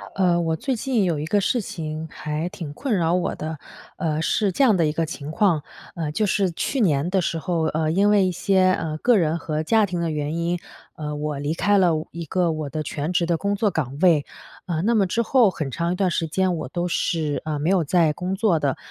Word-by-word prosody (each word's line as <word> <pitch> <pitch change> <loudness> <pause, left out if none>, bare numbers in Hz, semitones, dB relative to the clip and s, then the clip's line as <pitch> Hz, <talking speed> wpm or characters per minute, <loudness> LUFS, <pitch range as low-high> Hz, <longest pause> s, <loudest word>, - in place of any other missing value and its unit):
呃， 180 -2 +3
我 165 -1 0
最 260 - -2
近 240 -3 0
有 170 -5 0
一 150 - -3
个 205 +6 +2
事 230 +4 +1
情 160 -3 -5
还 150 +3 -3
挺 160 -5 -7
困 255 - -1
扰 170 -1 +1
我 180 - 0
的。 155 0 -5 0.4
呃， 160 -3 -1
是 200 +4 +1
这 230 - +1
样 230 -6 +5
的 165 - +3
一 - - +1
个 165 +2 -1
情 150 -2 -7
况， 165 -4 +2 0.3
呃， 160 -3 -3
就 215 +8 0
是 190 -2 +1
去 265 - -2
年 155 -5 +2
的 190 - +2
时 165 - -1
候， 170 -1 -1
呃， 155 0 0
因 200 +5 +3
为 205 -2 +4
一 - - 0
些， 185 +1 +3
呃， 160 -3 -2
个 240 +3 +4
人 165 -3 +1
和 155 -1 -2
家 220 +6 +3
庭 180 -2 -3
的 170 - -1
原 150 +1 -2
因， 170 +1 -1 0.4
呃， 150 -1 -5
我 150 -1 -3
离 145 +2 -1
开 205 +4 +3
了 180 -3 +4 0.2
一 170 0 -6
个 175 +2 +1
我 155 -2 -4
的 155 +2 -3
全 150 +2 -3
职 175 -1 +2
的 170 -1 +1
工 200 +4 -1
作 210 +1 +1
岗 140 -5 -3
位。 165 -6 +5 0.4
呃， 165 -3 -1
那 230 +4 +2
么 200 -3 +3
之 230 - 0
后 240 -2 +4
很 155 -5 -4
长 170 +5 -1
一 - - -2
段 190 0 +1
时 165 - -1
间 185 +3 +1
我 155 - -5
都 175 +6 -2
是， 160 -3 -1
呃， 155 -1 -2
没 155 +4 0
有 185 -3 +3
在 160 +1 +3
工 180 +4 -3
作 195 -5 +2
的。 140 -3 0
170 Hz, 265 characters per minute, -23 LUFS, 155-190 Hz, 0.4 s, 样